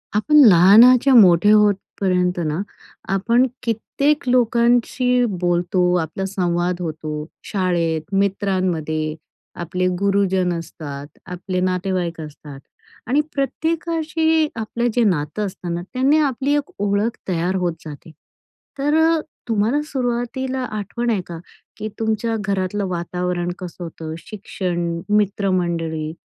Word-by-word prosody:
आपण 255 +9 +2
लहानाच्या 230 +9 +7
मोठे 195 -2 +6
होतपर्यंत 190 -3 +1
ना, 155 +4 -1 0.5
आपण 235 +6 +3 0.2
कित्येक 275 +6 -1
लोकांशी 245 +1 +2
बोलतो, 180 -1 0
आपला 160 +4 -4
संवाद 180 -2 -1
होतो. 155 -2 -4 0.2
शाळेत, 175 -5 -1
मित्रांमध्ये 185 -6 -1 0.5
आपले 180 +2 -1
गुरुजन 195 -2 +1
असतात, 145 -4 -8 0.2
आपले 180 +1 -4
नातेवाईक 180 -2 -1
असतात. 150 -2 -10 0.5
आणि 275 +5 +3
प्रत्येकाशी 320 +2 0
आपलं 230 +2 -2
जे 240 - +2
नातं 185 +1 0
असतं 180 -3 -5
ना, 170 - -3
त्यांनी 270 +4 +3
आपली 280 -1 0
एक 290 -1 -2
ओळख 205 +3 0
तयार 180 +1 -1
होत 180 -2 0
जाते. 155 +1 -10 0.7
तर 295 +3 +1
अ, 325 0 +3 0.3
तुम्हाला 225 +6 +1
सुरुवातीला 260 -1 -2 0.2
आठवण 235 +4 -3
आहे 210 -5 +1
का? 170 -1 -7 0.4
की 215 - -4
तुमच्या 225 +1 -1
घरातलं 195 0 -2
वातावरण 180 0 -2
कसं 180 -1 -8
होतं, 160 -1 -7
शिक्षण, 175 -4 -4
मित्रमंडळी 175 -6 0
195 Hz, 110 wpm, -20 LUFS, 175-235 Hz, 0.7 s, लहानाच्या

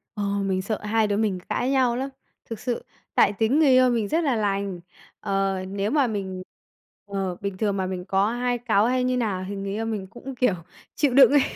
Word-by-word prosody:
Ờ, 205 - -2
mình 195 -2 0
sợ 210 +2 -3
hai 220 0 +2
đứa 205 0 0
mình 205 -4 0
cãi 250 +2 0
nhau 255 -3 +3
lắm, 265 +2 -2 0.4
thực 225 - -5
sự, 245 -2 -3 0.3
tại - - +5
tính 225 +9 +2
người 300 -4 +5
yêu 255 -1 +6
mình 225 -4 0
rất 325 +6 +1
là 270 -5 +1
lành. 200 -3 -1 0.4
Ờ, 195 -1 0
nếu 200 +3 -2
mà 285 -4 +3
mình 190 -4 -4 0.7
ờ, 195 -3 -2
bình 200 -2 -4
thường 205 -2 0
mà 190 - 0
mình 185 -1 -4
có 195 +3 +1
hai 245 0 0
cáu 220 -3 +2
hay 250 +1 +1
như 255 0 +1
nào 195 -6 -1
thì 200 - -4
người 195 0 -4
yêu 225 +2 -2
mình 210 -4 -3
cũng, 255 +5 -9
kiểu, 250 -6 +2 0.4
chịu 285 -5 +2
đựng 275 +1 +8
ấy. 290 -2 +5
215 Hz, 225 wpm, -24 LUFS, 195-245 Hz, 0.7 s, đựng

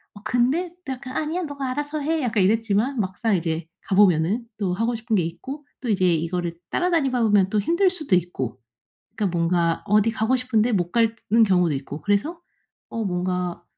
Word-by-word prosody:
어 205 - -12
근데 255 +10 +1
또 265 - -2
약간 255 0 -9
"아니야. 325 +4 -1
너가 280 -3 -4
알아서 290 +3 -3
해." 315 +2 0
약간 225 -4 +1
이랬지만 225 +4 +1
막상 200 +2 0
이제 165 -1 -2
가 190 - -2
보면은 190 +3 +4
또 190 -4 -1
하고 230 +5 0
싶은 225 0 -1
게 180 - +2
있고 265 - -6
또 245 - -5
이제 185 -4 +3
이거를 170 +1 -2
따라다니다 310 -9 +1
보면 205 -4 +4
또 215 - +2
힘들 340 - +2
수도 305 - 0
있고 150 -9 -2 0.6
그러니까 195 -5 -1
뭔가 170 0 +1
어디 210 +2 +3
가고 220 +4 +1
싶은데 245 -2 +1
못 175 -3 0
가는 230 -1 +2
경우도 180 -5 +3
있고 140 +2 -6
그래서 205 - 0 0.5
어 230 -1 -3
뭔가 180 -1 -2
215 Hz, 365 characters per minute, -23 LUFS, 180-255 Hz, 0.6 s, 보면은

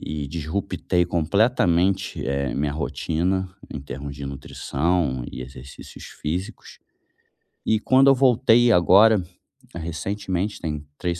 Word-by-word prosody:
e 75 -1 -5
desrupetei 90 +3 -1
completamente, 95 +1 +1
eh, 70 0 -1
minha 70 +1 -1
rotina 85 +5 -1 0.2
em 75 - -6
termos 70 +1 -7
de 70 - -7
nutrição 70 0 -2
e 65 - -7
exercícios 65 +1 -11 0.2
físicos 90 +5 -5 0.9
e 110 - +2
quando 130 +4 +4
eu 135 - +6
voltei 120 -2 +4
agora, 100 +2 +5 0.5
recentemente, 95 +4 -3
tem 75 -2 -4
3 85 -1 -3
85 Hz, 115 wpm, -23 LUFS, 75-100 Hz, 0.9 s, eu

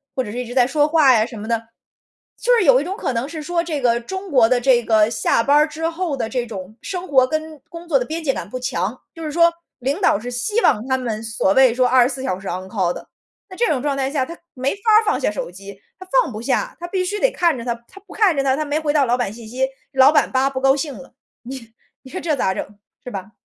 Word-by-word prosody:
或 260 - 0
者 210 - -7
是 240 - -6
一 250 - -3
直 240 - -8
在 250 -2 +4
说 295 +2 +2
话 300 -4 +5
呀 215 -1 +3
什 235 -2 -9
么 210 - -7
的。 230 -1 0 0.8
就 - - +3
是 460 - +3
有 265 -3 +6
一 - - -3
种 370 +5 -4
可 265 - -2
能 235 +3 -2
是 315 -1 -6
说 340 +1 -1
这 315 -4 -3
个 235 -1 +2
中 380 +10 -7
国 250 -5 +5
的 250 -1 +2
这 245 -2 +4
个 220 -1 +3
下 220 0 +1
班 285 +3 +4
儿 300 +1 +4
之 320 +2 -3
后 335 -3 -3
的 225 - -2
这 250 -1 -2
种 205 0 -8
生 370 -1 -5
活 260 -3 +4
跟 310 +1 -4
工 340 0 -10
作 295 - +3
的 245 - -2
边 320 +3 -5
界 270 -3 +1
感 - - -6
不 255 - -5
强。 210 -1 -2 0.2
就 330 - -9
是 305 - -3
说 335 +2 +4 0.3
领 275 +8 -2
导 365 - +3
是 240 +3 -6
希 245 - -1
望 215 - +2
他 260 - +1
们 230 -4 -4
所 220 -3 0
谓 260 -1 +5
说 250 +1 +2
24 260 +1 +2
小 185 -7 -2
时 195 - -9
On 185 +2 -4
call 190 -4 0
的。 - - -10 0.4
那 370 - -11
这 470 - +2
种 275 -5 0
状 280 0 -1
态 270 0 -1
下， 275 -3 0
他 335 +4 -9 0.2
没 260 +2 -1
法 400 - -20 0.2
儿 - - -7
放 420 - +1
下 - - 0
手 210 - -5
机， 195 +2 -12 0.2
他 375 - -11 0.2
放 290 - -6
不 215 -1 -6
下。 - - -1
他 345 - -6
必 370 +1 -1
须 415 +3 -3
得 - - +3
看 340 -5 +1
着 235 - -7
它， 240 - 0
他 395 - -15
不 - - -12
看 405 -7 +3
着 275 - +2
它， 265 -1 +2
他 305 - -1
没 290 +1 -1
回 300 -2 -1
到 290 -3 +3
老 245 0 +1
板 240 -5 -2
信 230 0 -11
息， 260 +4 -1 0.3
老 270 +1 +6
板 305 - +3
“叭， 265 +1 +2
不 260 -1 -4
高 270 0 +4
兴 285 0 -3
了”， 185 - -13 0.3
你 240 -2 -9 0.3
你 260 - -13
说 370 - -4
这 315 -3 0
咋 190 -8 0
整， 205 +2 -7 0.3
是 - - -7
吧？ 195 -2 -7
265 Hz, 310 characters per minute, -20 LUFS, 235-315 Hz, 0.8 s, 有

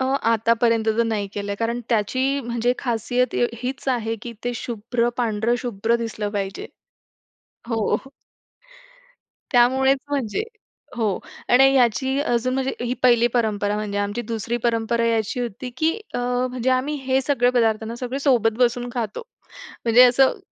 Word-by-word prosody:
अ, - - +1 0.3
आतापर्यंत 230 0 +2
तर - - +5
नाही 215 -3 -1
केलंय, 200 0 -3
कारण 235 +1 -1
त्याची 255 +5 +1
म्हणजे 240 +1 0
खासियत 245 +1 -1
य 240 - +2 0.2
हीच 265 +2 -4
आहे 225 -1 -3
की 240 - -6
ते 245 - -1
शुभ्र 235 +1 -2
पांढरं 230 -1 0
शुभ्र 235 -1 0
दिसलं 215 -2 -4
पाहिजे. 195 0 -4 1.0
हो. 225 -3 +1 1.6
त्यामुळेच 265 +2 +4
म्हणजे 275 - -1 0.5
हो, 215 -5 0 0.3
आणि 270 +2 +6
याची 265 +2 +2
अजून 255 -2 0
म्हणजे 265 0 -1
ही 245 - -1
पहिली 240 -2 +5
परंपरा 210 -3 +1
म्हणजे 210 -1 -3
आमची 205 +4 -2
दुसरी 230 +1 -2
परंपरा 230 0 +1
ही 230 - +2
अशी 225 +3 -1
होती, 245 +1 -5
की 315 +4 +2 0.2
अ, - - 0
म्हणजे 250 0 -1
आम्ही 260 +4 +1
हे 265 0 +3
सगळे 250 -3 +2
पदार्थ 225 -2 +2
ना 230 - -5
सगळे 250 +2 -4
सोबत 245 -6 +3
बसून 245 0 +1
खातो. 230 - -3 0.6
म्हणजे 235 +2 +6
असं 255 +2 +4
240 Hz, 150 wpm, -22 LUFS, 225-255 Hz, 1.6 s, आणि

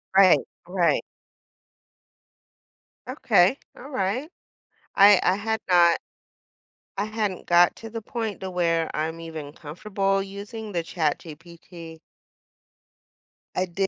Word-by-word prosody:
Right, 190 -2 +7 0.3
right. 175 -4 +1 2.1
Okay, 180 +9 +3 0.2
alright, 255 - -3 0.7
I 200 -1 +7
I 185 - +2
had 220 +2 -2
not 175 -2 +5 1.0
I 200 - +1
hadn't 215 -3 -3
got 175 0 +4
to 225 - -9
the 225 0 -6
point 225 -2 -4
to 190 - -5
where 165 -2 0
I'm 160 +2 -3
even 160 -3 -8
comfortable 195 +6 -2
using 205 +2 -8
the 170 -2 -1
ChatGPT. 165 +1 -5 1.6
I 185 - +1
did 190 +2 -2
185 Hz, 105 wpm, -24 LUFS, 165-205 Hz, 2.1 s, Right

